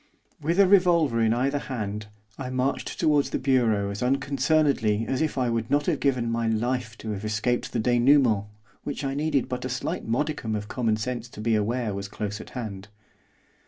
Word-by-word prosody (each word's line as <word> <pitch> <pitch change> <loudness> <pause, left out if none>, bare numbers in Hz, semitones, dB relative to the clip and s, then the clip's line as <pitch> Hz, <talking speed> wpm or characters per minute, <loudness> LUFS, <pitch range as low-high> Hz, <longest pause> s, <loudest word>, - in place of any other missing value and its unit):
With 165 +5 0
a 200 - +8
revolver 170 - +4
in 110 -1 +3
either 135 +5 +1
hand 105 -6 -4 0.3
I 130 -2 -5
marched 130 +2 -2
towards 150 -4 +3
the - - -1
bureau 115 -7 +2
as 100 - -6
unconcernedly 135 -4 +1
as 130 - -1
if 155 -3 -1
I 125 -2 +1
would 115 0 -2
not 145 +1 +2
have 165 -5 0
given 125 -4 +1
my 115 0 0
life 115 +1 -1
to 110 - -5
have 100 -1 -5
escaped 110 +3 -1
the 120 - -1
dénouement 120 -3 +3 0.4
which 145 0 -4
I 135 0 -1
needed 145 -2 0
but 125 0 -4
a 130 - -3
slight 130 0 -3
modicum 120 -2 -1
of 105 -1 -4
common 115 -2 0
sense 120 +1 -4
to - - -12
be 115 +1 +1
aware 110 +1 0
was 100 0 -4
close 105 +1 -5
at - - -11
hand. 105 -4 -6
125 Hz, 195 wpm, -26 LUFS, 110-140 Hz, 0.4 s, a